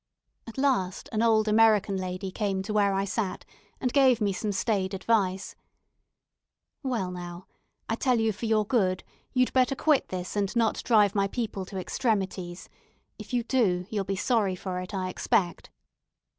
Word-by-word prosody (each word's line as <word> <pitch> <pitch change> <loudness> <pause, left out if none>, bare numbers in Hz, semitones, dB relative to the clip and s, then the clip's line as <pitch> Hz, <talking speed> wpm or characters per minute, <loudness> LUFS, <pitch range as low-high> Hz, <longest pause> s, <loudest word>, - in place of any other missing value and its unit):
At 230 - -10
last 255 -10 0
an 220 - 0
old 220 -2 +3
American 215 -2 +4
lady 185 0 -4
came 195 -1 -1
to 210 +2 -4
where 205 -1 +3
I 195 0 0
sat, 200 -1 -3 0.3
and 250 -2 -1
gave 265 -4 +5
me 205 -2 +1
some 210 +2 -2
staid 195 -2 0
advice. 195 -2 0 1.3
"Well, 235 -10 -2
now, 175 0 -7 0.4
I - - -1
tell 245 +1 +1
you 225 0 +2
for 220 +4 -5
your 215 -1 +2
good, 195 -5 +1 0.3
you'd 255 -1 +1
better 260 +1 +3
quit 300 0 +2
this, 180 0 -5
and 200 0 -1
not 230 -2 +1
drive 210 -4 +4
my 200 -2 +2
people 210 -3 -3
to 195 - -8
extremities. 190 -3 -2 0.5
If - - -9
you 245 -1 +1
do, 205 -8 +1
you'll 205 -2 0
be 195 +1 -2
sorry 205 -2 +1
for 180 0 -4
it, 180 0 -7
I 190 -2 -2
expect." 175 -1 0
205 Hz, 170 wpm, -27 LUFS, 185-230 Hz, 1.3 s, gave